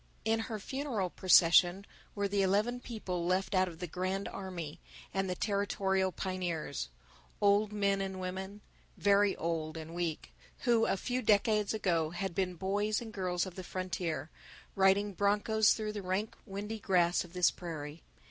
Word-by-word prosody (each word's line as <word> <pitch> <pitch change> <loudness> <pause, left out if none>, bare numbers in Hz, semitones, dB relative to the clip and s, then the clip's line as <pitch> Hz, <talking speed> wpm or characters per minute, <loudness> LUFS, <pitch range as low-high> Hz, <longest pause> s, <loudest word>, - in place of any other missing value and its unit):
In 225 0 +2
her 225 -1 -3
funeral 230 -5 -3
procession 180 +1 +5 0.3
were 200 -1 0
the 200 0 +1
eleven 210 +6 +2
people 195 -8 -4
left 185 +4 0
out 185 -1 +3
of 170 -2 -8
the 180 - -4
Grand 185 +3 -2
Army 175 -5 -6 0.3
and 195 -1 0
the 180 - -1
Territorial 195 -1 0
Pioneers, 175 - -3 0.5
old 205 +1 +3
men 200 -1 +1
and 190 -1 -4
women, 190 +2 -5 0.4
very 200 0 +4
old 160 -1 -2
and 160 +1 -7
weak, 170 -3 -3 0.3
who 235 -3 +3
a - - +1
few 250 +6 -2
decades 210 -1 +3
ago 170 -7 +1
had 175 +2 -3
been 180 0 -1
boys 205 +4 0
and 225 -2 -8
girls 180 -2 -1
of 185 - -7
the 185 - -7
frontier, 180 -4 -3 0.4
riding 195 +1 +3
broncos 205 +2 +3
through 215 -1 -3
the 205 - -4
rank 190 +3 -2
windy 210 +3 -5
grass 175 -3 +2
of 175 -1 -14
this 180 -1 +4
prairie. 155 -3 -7
190 Hz, 160 wpm, -32 LUFS, 180-205 Hz, 0.5 s, procession